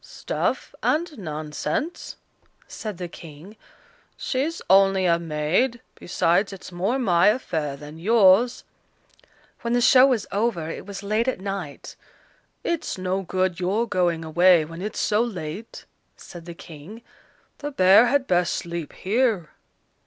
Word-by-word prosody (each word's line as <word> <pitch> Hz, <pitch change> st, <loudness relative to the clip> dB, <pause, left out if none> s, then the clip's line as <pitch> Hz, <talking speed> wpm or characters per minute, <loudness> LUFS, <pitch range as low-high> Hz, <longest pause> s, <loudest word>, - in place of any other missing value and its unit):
"Stuff -, -, -3 dB
and 320 Hz, 0 st, 0 dB
nonsense," 155 Hz, -, -4 dB, 0.5 s
said 210 Hz, -5 st, -7 dB
the 180 Hz, -1 st, -5 dB
King; 165 Hz, +4 st, -12 dB, 0.6 s
"she's 285 Hz, +6 st, -2 dB
only 195 Hz, 0 st, +4 dB
a 170 Hz, -1 st, +3 dB
maid, 170 Hz, +10 st, 0 dB
besides 175 Hz, +3 st, 0 dB
it's 195 Hz, -1 st, -10 dB
more 190 Hz, +9 st, -1 dB
my 180 Hz, -9 st, +3 dB
affair 160 Hz, -, 0 dB
than 150 Hz, +2 st, -11 dB
yours." 215 Hz, +4 st, +4 dB, 1.0 s
When 235 Hz, -1 st, -2 dB
the 245 Hz, -, +3 dB
show 255 Hz, +2 st, +7 dB
was 245 Hz, -6 st, 0 dB
over, 205 Hz, -6 st, -1 dB
it -, -, -8 dB
was 200 Hz, 0 st, -7 dB
late 215 Hz, +4 st, 0 dB
at 260 Hz, -, -1 dB
night. 195 Hz, -7 st, -6 dB, 0.7 s
"It's 340 Hz, -10 st, -2 dB
no 185 Hz, +1 st, -1 dB
good 185 Hz, -1 st, -1 dB
your 200 Hz, +6 st, 0 dB
going 175 Hz, -5 st, 0 dB
away, 175 Hz, 0 st, +4 dB
when 165 Hz, +2 st, -9 dB
it's 210 Hz, +2 st, -4 dB
so 210 Hz, +1 st, +2 dB
late," 200 Hz, -2 st, -6 dB, 0.3 s
said 175 Hz, -2 st, -11 dB
the 170 Hz, -1 st, -8 dB
King. 170 Hz, +9 st, -12 dB, 0.6 s
"The 290 Hz, -, -4 dB
bear 200 Hz, -2 st, +6 dB
had 285 Hz, 0 st, +1 dB
best 180 Hz, -3 st, +1 dB
sleep 170 Hz, -3 st, -5 dB
here." 210 Hz, -5 st, 0 dB
190 Hz, 140 wpm, -24 LUFS, 170-230 Hz, 1.0 s, show